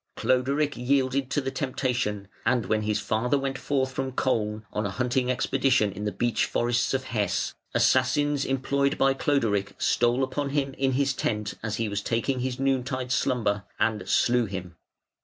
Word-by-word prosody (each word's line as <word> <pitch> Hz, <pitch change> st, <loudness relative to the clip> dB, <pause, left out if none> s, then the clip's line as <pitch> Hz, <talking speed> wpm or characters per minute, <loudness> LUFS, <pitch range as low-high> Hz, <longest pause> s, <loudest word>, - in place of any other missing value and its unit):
Cloderic 140 Hz, +3 st, +1 dB
yielded 130 Hz, +1 st, +1 dB
to 145 Hz, -, 0 dB
the 135 Hz, 0 st, -3 dB
temptation, 125 Hz, -8 st, -2 dB, 0.2 s
and 120 Hz, -5 st, +1 dB
when 110 Hz, +2 st, +1 dB
his 105 Hz, 0 st, 0 dB
father 125 Hz, +7 st, 0 dB
went 135 Hz, 0 st, -3 dB
forth 135 Hz, -2 st, 0 dB
from 130 Hz, 0 st, -3 dB
Koln 110 Hz, -5 st, 0 dB
on 105 Hz, -, -1 dB
a 100 Hz, -, -1 dB
hunting 125 Hz, +4 st, 0 dB
expedition 130 Hz, -4 st, +2 dB
in 100 Hz, +2 st, -6 dB
the 105 Hz, -, 0 dB
beech 120 Hz, +1 st, 0 dB
forests 120 Hz, +2 st, +1 dB
of 130 Hz, -, -1 dB
Hesse, 105 Hz, -6 st, -1 dB, 0.2 s
assassins 140 Hz, +2 st, +3 dB
employed 140 Hz, +1 st, 0 dB
by 135 Hz, 0 st, +4 dB
Cloderic 110 Hz, -9 st, 0 dB
stole 120 Hz, +2 st, +2 dB
upon 140 Hz, +2 st, -2 dB
him 140 Hz, -1 st, -1 dB
in 135 Hz, 0 st, 0 dB
his 140 Hz, +1 st, +1 dB
tent, 105 Hz, -5 st, -2 dB
as 110 Hz, -1 st, -2 dB
he 115 Hz, 0 st, -1 dB
was 100 Hz, 0 st, -2 dB
taking 120 Hz, +4 st, -1 dB
his 125 Hz, 0 st, -3 dB
noon 135 Hz, -2 st, +1 dB
tide 130 Hz, 0 st, -4 dB
slumber, 110 Hz, -5 st, 0 dB
and 110 Hz, -2 st, 0 dB
slew 120 Hz, 0 st, +3 dB
him. 90 Hz, -3 st, -6 dB
125 Hz, 175 wpm, -26 LUFS, 110-135 Hz, 0.2 s, by